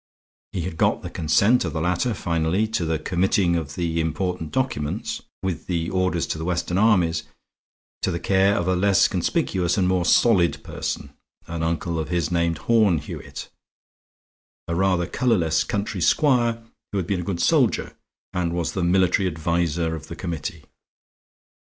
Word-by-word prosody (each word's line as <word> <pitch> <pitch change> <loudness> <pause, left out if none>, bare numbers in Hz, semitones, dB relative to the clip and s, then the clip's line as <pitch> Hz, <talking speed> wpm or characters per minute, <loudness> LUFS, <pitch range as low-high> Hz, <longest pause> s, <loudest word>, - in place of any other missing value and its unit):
He 90 - -3
had 85 -1 -5
got - - +1
the - - -6
consent 100 +9 +3
of 85 -5 -3
the 80 - -2
latter 90 +8 0
finally 85 +4 0
to 110 -6 -1
the 80 0 0
committing 90 +2 +1
of 80 -2 -3
the 85 -2 -1
important 80 +1 -2
documents, 100 - -2 0.2
with 95 -3 -3
the 85 -2 -1
orders 95 -3 0
to 80 - -4
the - - -4
Western 90 +1 -1
armies, 90 -7 +3 0.8
to - - 0
the 85 -1 -2
care 95 +3 +3
of 85 - -1
a 95 - +2
less 95 +1 +4
conspicuous 90 -1 0
and 95 -2 +2
more 90 -1 +2
solid 95 -5 +3
person - - -5 0.3
an 85 -1 -5
uncle 80 0 -1
of 80 - -4
his 85 -3 -1
named 85 -1 +1
Horne 105 -2 +3
Hewitt, 75 - -7 1.2
a 85 - -2
rather 90 0 +2
colorless 85 -10 +1
country 100 -2 -3
squire 120 - +2 0.3
who 100 - -2
had 95 - -1
been 95 0 -1
a - - -5
good 85 -1 -3
soldier, - - +2 0.4
and 85 -2 -1
was 85 -1 -1
the 95 - -2
military 95 +2 +3
adviser 85 0 -1
of 80 - -9
the - - -7
committee. 85 -1 -5
85 Hz, 165 wpm, -23 LUFS, 80-95 Hz, 1.2 s, less